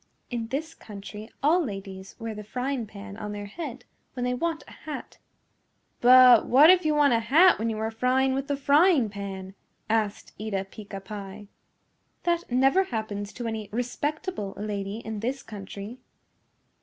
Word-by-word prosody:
"In 235 -2 -3
this 290 +6 -4
country 210 +1 -10
all 335 +5 +4
ladies 195 -5 -7
wear 225 -2 -5
the 210 0 -7
frying 250 +2 -3
pan 200 0 -9
on 210 -1 -5
their 205 0 -5
head 255 +2 -7 0.3
when 250 - -4
they 250 0 0
want 325 +5 -2
a - - -13
hat." 305 - -8 0.8
"But 250 -1 +8
what 290 +7 +8
if 365 -1 +4
you 305 -1 +2
want 290 -3 +4
a 230 - +3
hat 300 - +5
when 225 +1 0
you 220 - -3
are 220 +1 -2
frying 255 +3 +2
with 270 +1 -2
the 285 -1 -1
frying 285 - +4
pan?" 195 -2 -7 0.4
asked 215 -2 -1
Eeta 200 -3 -2
Peeca 200 -2 -8
Pie. 200 0 -8 0.7
"That 345 -4 0
never 270 +10 +4
happens 215 - -4
to 240 - -6
any 220 -2 -4
respectable 245 - -3
lady 205 +1 -4
in 220 -1 -4
this 255 +5 -3
country." 205 +3 -8
225 Hz, 165 wpm, -26 LUFS, 205-275 Hz, 0.8 s, But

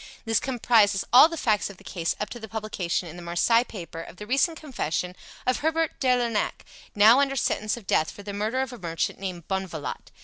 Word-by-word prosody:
This 225 -1 +2
comprises 225 -6 +2
all 265 +6 +9
the 330 - -5
facts 215 -8 +1
of 200 - -11
the - - -17
case 170 -3 -2
up 210 - -2
to 240 - -7
the 220 - -8
publication 205 -5 -3
in 165 +2 -9
the - - -8
Marseilles 230 +8 +2
papers 165 -5 -8
of - - -13
the 210 - -9
recent 275 +8 +1
confession 180 - -3 0.3
of 255 - +2
Herbert 320 +1 0
de 265 - 0
Lernac, 235 -3 -1 0.3
now 220 +5 +7
under 275 -1 +1
sentence 215 -3 0
of 230 - -11
death 155 -4 +2
for 205 - -11
the 200 0 -6
murder 215 +6 -1
of 265 -2 -4
a 245 - -9
merchant 165 -3 -2
named 180 -4 -6
Bonvalot. 190 -6 -4
210 Hz, 215 wpm, -26 LUFS, 180-245 Hz, 0.3 s, all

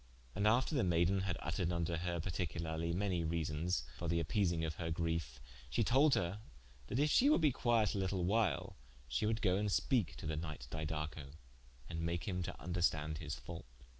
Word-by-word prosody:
And 100 +2 +1
after 125 +8 +3
the 135 - +2
maiden 85 +2 +3
had 95 -3 -1
vttered 85 +2 -2
vnto 85 -1 -1
her 85 0 -2
particularly 85 -1 -2
many 90 -1 0
reasons, 80 -1 -1 0.2
for 85 - -3
the 85 +1 +2
appeasing 85 -1 +1
of 80 -1 -4
her 85 -1 -3
griefe, 80 -6 -2 0.3
she - - +1
told 140 +4 +5
her 90 +4 -1 0.5
that 115 - -2
if 150 +2 +3
she 275 - +6
would 300 - +4
be 150 -3 +5
quiet 115 -3 +2
a 100 - -1
litle 95 -1 0
while, 100 -6 +1 0.3
she 65 - 0
would 110 0 -1
go 95 -2 +3
and 105 0 0
speake 115 - +1
to - - -8
the 80 0 -1
knight 75 -6 -5
Didaco, 75 -2 -4 0.5
and 80 -1 -4
make 85 0 -2
him 90 -2 -1
to 85 - -3
vnderstand 80 -3 -1
his 75 -3 -4
fault. - - -9
85 Hz, 195 wpm, -36 LUFS, 80-100 Hz, 0.5 s, she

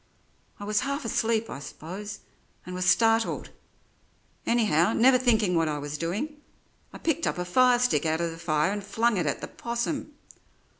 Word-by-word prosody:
I - - -7
was 210 0 +1
half 280 +3 -3
asleep, 225 0 0
I - - -7
suppose, 190 +8 -8 0.4
and 180 - -7
was 180 0 -2
startled; 225 0 +2 1.0
anyhow, 215 -5 +3
never 255 +2 +5
thinking 220 -7 +2
what 165 -2 +2
I 150 -1 -1
was 145 0 -5
doing, 205 - -3 0.5
I - - -9
picked 325 0 -1
up - - -1
a 180 - -2
firestick 245 - +3
out 160 0 0
of 170 -1 -1
the 165 - -10
fire 155 +1 +1
and 205 0 -4
flung 220 +2 +1
it 170 -4 0
at 140 - -2
the - - -5
'possum. 240 +6 -4
210 Hz, 170 wpm, -27 LUFS, 170-235 Hz, 1.0 s, never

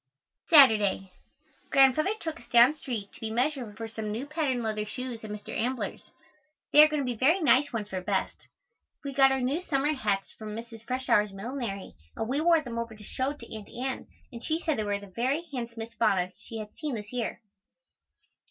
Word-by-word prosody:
Saturday. 210 - +6 0.6
Grandfather 280 +9 +4
took 325 -1 -5
us - - -17
down 240 +4 +7
street 235 -9 -5
to - - -15
be 225 - -3
measured 245 -2 -1
for 225 - -5
some 220 -1 -5
new 230 +6 -3
patten 285 -5 -1
leather 215 -1 -1
shoes 245 +1 -6
at 215 - -7
Mr. 210 0 -7
Ambler's. 250 +2 -2 0.7
They 295 - +10
are 305 - +9
going 305 -1 -1
to - - -2
be 250 - -1
very 290 - +3
nice 285 -3 +4
ones 220 -4 -3
for 185 -2 -3
best. 190 +1 -2 0.6
We 280 -1 -4
got 270 0 +6
our 265 0 0
new 275 +7 0
summer 295 -3 0
hats 205 -8 -1
from 215 -1 -8
Mrs. 230 0 -9
Freshour's 250 -5 +2
millinery 200 -1 -5 0.2
and 225 - -3
we 275 +5 0
wore 335 -1 +5
them 235 -5 -5
over 230 -1 -5
to 210 - -13
show 260 +6 -2
to 230 -6 -10
Aunt 215 -2 -9
Ann 255 +2 -4 0.3
and 235 0 -8
she 320 +1 0
said 315 -7 -1
they - - 0
were 205 -1 -1
the 200 - -10
very 250 - -1
handsomest 230 -2 -6
bonnets 185 -5 +1
she 225 - -8
had 210 -1 -7
seen 300 -5 -3
this 210 +1 -8
year. 245 -2 -2
240 Hz, 200 wpm, -28 LUFS, 215-275 Hz, 0.7 s, They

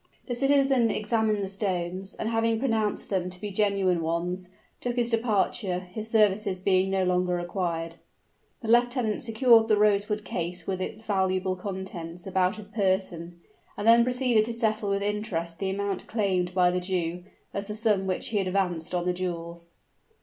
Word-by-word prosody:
The 245 - -3
citizen 270 -2 +3
examined 215 -1 0
the - - -2
stones, 190 -1 -3
and 220 - -3
having 225 0 +1
pronounced 220 -5 -1
them 180 -2 0
to 180 0 -11
be 210 +1 -4
the - - -9
genuine 195 -4 +2
ones, 175 +3 -2 0.3
took 245 -1 -2
his 240 -1 +1
departure, 215 -4 +1
his 200 +5 -5
services 210 -3 +2
being 190 0 +2
no 190 -1 +1
longer 180 0 +1
required. 170 -2 -3 0.7
The - - -4
lieutenant 240 -1 +2
secured 230 -1 +5
the 215 -2 +3
rosewood 210 0 +2
case 175 0 -4
with 185 -1 -2
its 215 +4 -5
valuable 190 -2 0
contents 180 -3 -6
about 190 0 +1
his 215 -2 -9
person, 185 -5 -1 0.4
and 205 - -2
then 235 +1 +7
proceeded 250 -3 +2
to 235 - -3
settle 220 -2 0
with 200 0 0
interest 190 -5 -2
the 195 - -1
amount 200 0 -3
claimed 185 -5 0
by 180 -1 +4
the 180 0 -1
Jew, 180 -1 -2 0.3
as 200 0 -4
the 210 - -4
sum 210 -3 +1
which 185 - -2
he 210 - 0
had 190 - -1
advanced 180 -3 -1
on 175 0 -1
the 180 - +1
jewels. 170 -1 -5
195 Hz, 175 wpm, -27 LUFS, 180-220 Hz, 0.7 s, then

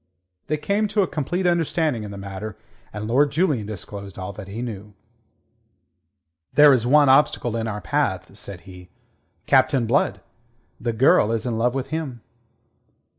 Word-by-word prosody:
They 155 - 0
came 200 +8 0
to 205 0 +1
a - - -1
complete 175 +5 -2
understanding 165 -6 +1
in 105 - -6
the 100 - -8
matter, 100 +2 -7 0.3
and 105 0 -5
Lord 140 +5 +3
Julian 150 - 0
disclosed 100 -1 -8
all 95 +1 -6
that 95 -1 -9
he 110 +5 -5
knew. 105 -3 -7 1.6
"There 145 +1 +7
is 120 -2 +1
one 145 +2 +5
obstacle 130 -3 +3
in 115 0 -2
our 105 -1 -4
path," 85 - -1
said 95 -3 -8
he. 90 0 -13 0.6
"Captain 130 -4 +3
Blood. 125 +6 +1 0.6
The 120 -1 -2
girl 110 -2 +4
is 115 0 -2
in 115 -2 -2
love 125 +2 +1
with 135 0 -3
him." 145 -6 -4
120 Hz, 160 wpm, -23 LUFS, 105-150 Hz, 1.6 s, There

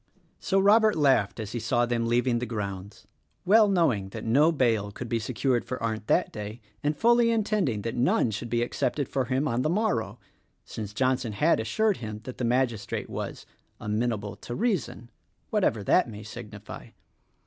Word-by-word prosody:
So 195 - 0
Robert 215 +2 +5
laughed 135 -9 +2
as 110 -1 -5
he 120 - -3
saw 120 +1 +1
them 120 -1 -1
leaving 120 0 +2
the 125 - -4
grounds, 100 -3 -6 0.2
— 75 - -45
well 215 +3 +6
knowing 140 - +1
that - - -7
no 145 +8 +4
bail 115 -9 +1
could 125 +4 -7
be 115 0 0
secured 125 +2 0
for 125 - -5
Arndt 110 -2 -3
that - - +2
day, 105 +2 -6 0.2
and 150 0 -1
fully 235 0 +4
intending 205 - 0
that 115 - -3
none 120 -2 +2
should 115 +3 -5
be 120 +1 +1
accepted 140 +3 -1
for 135 -2 -1
him 130 +4 0
on 120 -2 0
the 155 - 0
morrow; 165 - 0 0.5
since 105 -2 -6
Johnson 125 0 0
had 150 +9 +2
assured 200 - +1
him 110 -2 -7
that 130 +1 -8
the - - -2
magistrate 120 -3 -1
was - - -5 0.3
"Amenable 105 -1 -2
to 120 - -7
Reason" 190 - -2 0.2
— - - -44
whatever 180 - +1
that 180 - +3
may 105 -1 -9
signify. 110 - -9
120 Hz, 180 wpm, -27 LUFS, 110-150 Hz, 0.5 s, well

